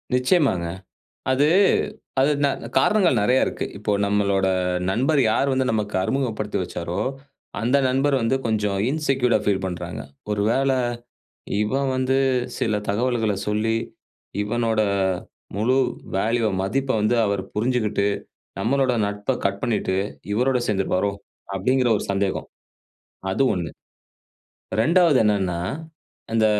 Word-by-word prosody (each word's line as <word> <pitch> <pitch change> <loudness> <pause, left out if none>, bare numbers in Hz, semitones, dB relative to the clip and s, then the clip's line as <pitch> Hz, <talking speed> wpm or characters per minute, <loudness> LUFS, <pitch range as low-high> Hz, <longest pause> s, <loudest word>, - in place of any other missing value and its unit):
நிச்சியமாங்க. 125 - +2 0.7
அது 140 +3 +3 0.7
அது 135 +3 +4
ந - - +5 0.3
காரணங்கள் 195 +6 +3
நெறைய 125 +5 +3
இருக்கு. - - -3
இப்போ 105 0 -1
நம்மளோட 100 -1 +1 0.4
நண்பர் 135 +8 +2
யார் 135 +5 +2
வந்து 130 0 +1
நமக்கு 105 -2 -2
அறிமுகப்படுத்தி 110 -2 -1
வச்சாரோ, 85 0 -4 0.6
அந்த 120 +5 +2
நண்பர் 135 +2 +2
வந்து 115 +3 +1
கொஞ்சம் 105 -3 0
இன்செக்யூர்ட்டா 135 -5 +1
ஃபீல் 95 -2 +1
பண்றாங்க. 90 -3 -5 0.3
ஒரு 105 -1 0
வேள 135 +3 +2 0.9
இவன் 135 +6 0
வந்து 130 +1 +1 0.4
சில 110 -2 0
தகவல்கள 115 0 +1
சொல்லி, 105 +2 +1 0.7
இவனோட 110 +1 0 0.7
முழு 115 +6 +2 0.4
வேல்யூவ 115 +2 +1
மதிப்ப 135 +7 0
வந்து 110 +3 +2
அவர் 100 -1 0
புரிஞ்சுகிட்டு, 110 -3 +1 0.5
நம்மளோட 130 +4 +2
நட்ப 105 +5 -2
கட் 100 0 0
பண்ணிட்டு, 100 -5 0 0.4
இவரோட 125 +4 +2
சேர்ந்திருப்பாரோ? 95 0 +1 0.4
அப்டிங்கிற 125 +6 +2
ஒரு - - -5
சந்தேகம். 100 0 -1 0.8
அது 135 - +2
ஒண்ணு. 85 -2 -3 1.1
2வது 160 +5 +4
என்னன்னா, 95 -5 +1 0.7
அந்த 110 -1 +4
110 Hz, 115 wpm, -23 LUFS, 100-130 Hz, 1.1 s, ந